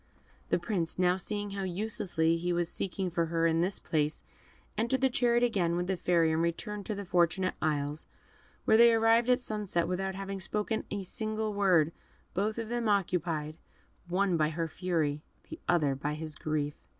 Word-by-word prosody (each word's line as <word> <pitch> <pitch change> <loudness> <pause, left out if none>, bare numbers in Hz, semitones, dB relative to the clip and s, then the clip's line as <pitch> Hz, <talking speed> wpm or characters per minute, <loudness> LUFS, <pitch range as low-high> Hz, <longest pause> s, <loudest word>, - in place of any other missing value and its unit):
The - - +3
Prince 175 -7 -2
now, 180 0 +3
seeing 205 +2 -3
how 195 0 -4
uselessly 185 -3 0
he 175 +1 -1
was 175 -1 0
seeking 190 -1 -3
for 170 -1 0
her 165 0 +1
in 165 0 +3
this 185 +3 0
place, 150 -1 -1 0.5
entered 235 +4 0
the 265 -1 +3
chariot 240 -1 +2
again 185 -8 +1
with 175 0 0
the 190 +1 0
Fairy, 170 -2 +2
and 160 +1 +1
returned 200 +5 -3
to 215 - -2
the 200 0 -5
Fortunate 180 +1 +2
Isles, 150 0 -1 0.6
where 220 - +5
they 235 0 +7
arrived 225 +2 +4
at 250 +1 +5
sunrise 210 -6 -5
without 190 +1 -2
having 195 0 -5
spoken 210 +4 -2
a 200 -1 -3
single 215 +2 -3
word, 180 -6 +3 0.4
both 210 +4 -1
of 230 -1 -3
them 240 -2 -1
occupied 170 -6 0 0.5
the 175 - -9
one 190 -3 +2
by 155 -1 +2
her 165 +1 -2
fury, 160 -3 -1 0.3
the 320 - -7
other 155 -6 +3
by 145 +3 -3
his 155 0 -5
grief. 150 -2 -2
185 Hz, 185 wpm, -30 LUFS, 165-210 Hz, 0.6 s, they